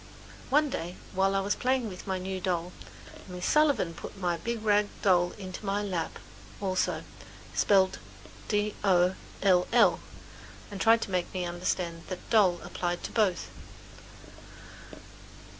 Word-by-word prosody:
One 295 +1 +3
day, 175 -2 -4 0.2
while 195 +1 +2
I 195 - +2
was 200 +1 0
playing 255 -2 0
with 185 -2 -9
my 190 -1 0
new 185 0 -4
doll, 180 -1 -1 0.5
Miss 180 -1 -5
Sullivan 290 - +3
put 165 - -9
my 175 -3 0
big 230 +5 -4
rag 210 -1 +3 0.2
doll 175 -3 +3
into 190 0 -8
my 205 +1 -1
lap 180 -5 -3 0.4
also, 185 -2 0 0.5
spelled 190 -2 +3 0.5
"d 210 -1 0
o 180 -2 +4 0.3
l 180 -2 +4
l" 235 -1 +5 0.7
and 200 -1 -6
tried 225 0 +5
to - - -7
make 180 -1 -1
me 180 -1 -1
understand 175 -1 -2
that 185 - -7
"d 225 - +5
o - - +9
l 190 -3 +4
l" 175 - -11
applied 175 -1 -3
to - - -5
both. 200 -6 +1
190 Hz, 155 wpm, -29 LUFS, 180-210 Hz, 0.7 s, o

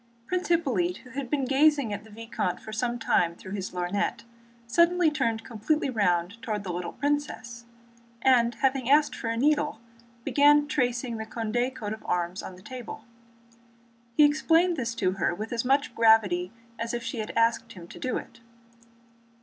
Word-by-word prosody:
Prince 365 +6 -2
Hippolyte, 235 - +1
who 255 - -14
had 265 -1 -5
been 280 -3 0
gazing 280 -3 +3
at 205 0 -5
the 220 - -16
vicomte 220 -3 -3
for 220 - -9
some 240 +2 -1
time 170 -7 +1
through 190 - -11
his 195 -1 -3
lorgnette, 180 +2 -2 0.4
suddenly 340 +5 +3
turned 230 -7 -1
completely 260 +6 -1
round 190 -1 0
toward 215 -5 -3
the 180 -3 -4
little 175 0 -4
princess, 275 -5 -3 0.6
and 240 -3 +4
having 265 -2 0
asked 295 +1 +4
for 230 - -5
a 230 0 -1
needle 295 -1 +1 0.4
began 290 +2 +4
tracing 245 -4 -1
the 220 - -5
Condé 235 +3 -1
coat 210 -3 -4
of 220 - -10
arms 175 +2 -1
on 185 - -8
the 185 - -16
table. 240 -1 -8 1.1
He 300 - +8
explained 325 +4 +3
this 235 -5 -3
to 185 - +1
her 175 -2 -1
with 215 +5 -5
as 230 - -1
much 275 0 +1
gravity 210 -6 +4 0.3
as 230 +1 -2
if 240 - -4
she 240 - -4
had 215 - -4
asked 230 0 +1
him 175 -3 -11
to - - -11
do 255 - -1
it. 235 - -9
235 Hz, 175 wpm, -27 LUFS, 210-275 Hz, 1.1 s, He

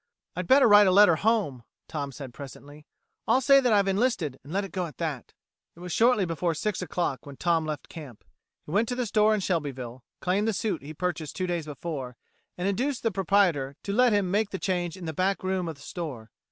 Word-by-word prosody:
"I'd 180 0 -4
better 270 0 +6
write 205 -1 +7
a - - +5
letter 185 -4 +6
home," 205 - +1 0.3
Tom 140 -3 -4
said 135 -3 -9
presently. 145 +2 -11 0.4
"I'll 255 - +4
say 275 +1 +6
that 250 -3 +2
I've 200 -2 +4
enlisted 195 - 0
and 140 - -11
let 200 +3 0
it 195 - -10
go 180 -1 -2
at 155 - -13
that." 155 -7 -4 0.4
It - - -16
was 180 0 -7
shortly 225 +2 +3
before 165 0 -1
six 210 +4 -2
o' 180 - -4
clock 145 -6 -2
when 140 -1 -10
Tom 165 -3 +1
left 150 -2 -5
camp. 145 -9 -11 0.4
He - - -9
went 210 +6 +2
to 245 - -1
the 250 -1 -1
store 215 0 +3
in 210 - -2
Shelbyville, 135 -9 -3 0.2
claimed 195 +4 0
the 225 - +1
suit 195 -3 -2
he 150 +3 -9
purchased 165 -3 -3
two 185 - -1
days 175 -3 -2
before, 140 -5 -6 0.4
and 180 +2 -1
induced 250 +7 -1
the 225 - +1
proprietor 180 -8 +1
to 200 - -3
let 250 +2 +4
him 200 -3 +1
make 210 +1 +1
the 190 - -4
change 180 -2 -2
in 180 - -8
the 160 - -4
back 190 +5 0
room 185 -2 -1
of 165 - -5
the 140 - -18
store. 140 - -7
180 Hz, 230 wpm, -27 LUFS, 150-205 Hz, 0.4 s, write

